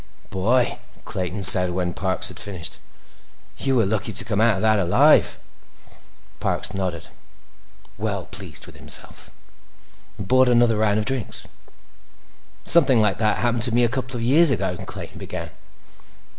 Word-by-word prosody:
"Boy," 115 +7 0 0.3
Clayton 95 +2 -5
said 90 -1 +8
when 90 0 -3
Parks 95 +1 0
had - - -9
finished, 90 -5 -2 0.8
"you 135 -1 0
were 115 -4 +3
lucky 110 +2 -2
to 100 - -2
come 105 -1 -1
out 115 -2 +3
of 95 - -4
that 110 -1 +3
alive!" 65 -8 +3 1.0
Parks - - -3
nodded, 90 -4 -4 0.9
well - - -3
pleased - - -9
with - - -15
himself, - - -2 0.9
and 100 - -7
bought 130 +1 +4
another 120 -2 +3
round 105 -1 +1
of 110 - -1
drinks. 130 -5 -3 1.2
"Something 140 -8 +3
like 105 -2 +1
that 110 -1 +1
happened 120 -1 -1
to 120 -1 +3
me 120 - +3
a 120 - +2
couple 130 0 -5
of 115 - -4
years 150 +7 +4
ago," 95 -7 -1
Clayton - - -9
began. - - -7
110 Hz, 150 wpm, -22 LUFS, 95-120 Hz, 1.2 s, said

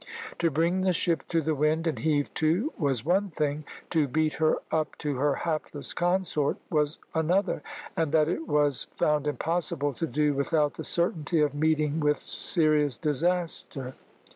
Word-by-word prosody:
To 170 - +3
bring 165 +5 +1
the 185 -1 +2
ship 170 -1 0
to 165 -1 +1
the 155 +1 0
wind 155 +3 +1
and 160 - -1
heave 150 -2 0
to 175 - +1
was 135 -6 -1
one 195 +4 +2
thing, 150 -2 -2 0.3
to 155 -4 +2
beat 155 +3 +1
her 155 - +4 0.2
up 155 -2 -1
to 145 -3 -3
her 140 +1 +2
hapless 155 -3 -3
consort 175 -5 0
was 150 -1 +1 0.2
another, 175 +3 +1 0.3
and 160 -3 0
that 155 -1 +4
it 165 -1 -2
was 145 -3 +1
found 150 -1 +1
impossible 155 -1 -1
to 165 +6 -3
do 150 -1 +1
without 145 +1 +1
the - - -7
certainty 170 -2 0
of 150 -2 +2
meeting 155 0 +1
with 150 -1 +2
serious 150 -6 +1
disaster. 155 -4 -1
155 Hz, 165 wpm, -27 LUFS, 145-165 Hz, 0.3 s, her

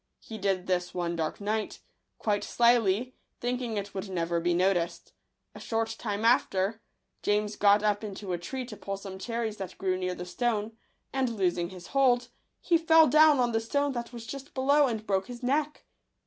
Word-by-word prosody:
He 220 -1 -9
did 190 -2 0
this 180 -1 -1
one 175 -1 -1
dark 160 -2 -2
night, 210 +1 -2 0.4
quite 205 -2 0
slyly, 235 0 +2 0.3
thinking 245 -2 -2
it 200 0 -4
would 195 0 -5
never 170 -2 -1
be 175 +1 0
noticed. 175 -2 0 0.4
A - - -10
short 225 0 -2
time 210 -1 -2
after, 225 -2 +2 0.4
James 210 0 0
got 205 0 +4
up 210 0 +1
into 200 -2 -5
a 175 - -2
tree 255 +9 -5
to 235 -3 -9
pull 195 -1 -5
some 195 -1 -8
cherries 230 0 -3
that 190 -2 -7
grew 185 -1 0
near 185 0 -2
the 180 - -6
stone; 220 +2 -1 0.4
and 265 -2 +1
losing 180 -5 0
his 180 -2 -11
hold, 255 -3 +3 0.3
he 335 -2 +3
fell 325 0 +6
down 305 +1 +6
on 240 -1 +2
the 225 - +1
stone 285 +5 0
that 240 -2 -5
was 235 -2 -8
just 275 +3 -8
below, 280 +2 +4
and 220 -3 -3
broke 195 -2 0
his 245 0 -9
neck. 295 +4 -1
215 Hz, 190 wpm, -28 LUFS, 190-245 Hz, 0.4 s, fell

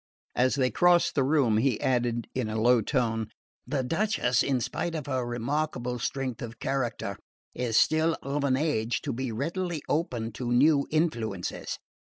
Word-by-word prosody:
As 130 +2 +3
they 130 -3 +1
crossed 175 +6 +4
the 140 - +2
room 130 -6 +3
he 125 -1 +1
added 120 -2 0
in 125 -4 -2
a 110 +1 -2
low 120 +1 +5
tone: 115 -2 0 0.4
"The 140 -3 -1
Duchess, 165 - +1
in 135 -2 +1
spite 165 +7 -3
of 150 -4 -4
her 130 -3 -1
remarkable 125 +1 -2
strength 130 -1 -3
of 115 -1 -6
character, 120 -6 -2 0.3
is 120 -3 0
still 160 +1 +3
of 140 +1 -2
an 130 -2 +2
age 125 -6 0
to 140 - -2
be 130 0 -3
readily 165 - -3
open 120 -8 -1
to 120 +2 -4
new 140 +3 +4
influences. 115 - -1
130 Hz, 160 wpm, -28 LUFS, 120-150 Hz, 0.4 s, low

